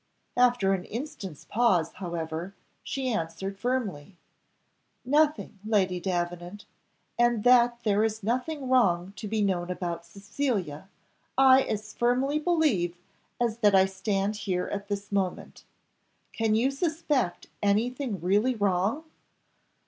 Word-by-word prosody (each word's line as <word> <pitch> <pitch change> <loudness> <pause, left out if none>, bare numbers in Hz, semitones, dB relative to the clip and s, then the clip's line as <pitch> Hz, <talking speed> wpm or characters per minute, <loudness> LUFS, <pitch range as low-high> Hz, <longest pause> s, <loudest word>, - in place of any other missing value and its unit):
After 245 -6 +3
an 185 -2 -2
instant's 210 - -7
pause, 195 -8 +2
however, 170 0 -5 0.3
she 265 -1 -3
answered 195 +2 -4
firmly, 200 - -3 0.9
"Nothing, 295 -5 +1
Lady 195 -4 +1
Davenant, 175 +2 -3 0.5
and 240 -3 +3
that 245 -1 +5
there 210 -1 +2
is 220 -1 -1
nothing 255 +6 -2
wrong 195 -8 +2
to 210 - -5
be 215 0 0
known 180 -3 0
about 175 -2 -3
Cecilia, 195 - -3 0.5
I 265 0 +7
as 215 -3 -4
firmly 255 +5 +1
believe 295 - +1 0.4
as 235 -1 0
that 205 -3 +4
I 190 0 +6
stand 195 +2 -1
here 185 -3 -1
at 200 0 -4
this 205 0 -4
moment. 195 -3 -3 0.7
Can 225 -2 +1
you 250 +5 +2
suspect 295 - -1 0.2
anything 225 +2 0
really 205 +8 +2
wrong?" 205 - 0
205 Hz, 120 wpm, -27 LUFS, 185-245 Hz, 0.9 s, I